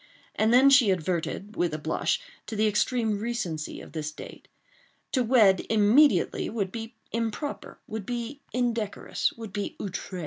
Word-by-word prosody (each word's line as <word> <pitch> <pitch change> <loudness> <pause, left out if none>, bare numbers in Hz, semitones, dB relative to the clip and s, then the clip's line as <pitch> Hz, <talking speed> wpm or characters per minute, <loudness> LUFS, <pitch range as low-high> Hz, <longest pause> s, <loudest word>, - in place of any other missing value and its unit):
And 220 +1 +2
then 260 +3 +7
she 265 -6 +6
adverted, 185 +3 -2
with 175 -3 0
a - - -2
blush, 160 - 0 0.3
to 220 - -5
the 215 +1 +2
extreme 215 0 +1
recency 205 -9 -3
of - - -12
this 155 -1 -4
date. - - -11 0.6
To 255 - +2
wed 220 -6 +5
immediately 225 +7 +4
would 200 -4 -2
be 225 +1 -7 0.2
improper—would 225 -2 -4
be 245 +4 -4
indecorous—would 230 -2 -2
be 205 -1 -3
outre. 190 -1 -5
220 Hz, 140 wpm, -27 LUFS, 190-240 Hz, 0.6 s, then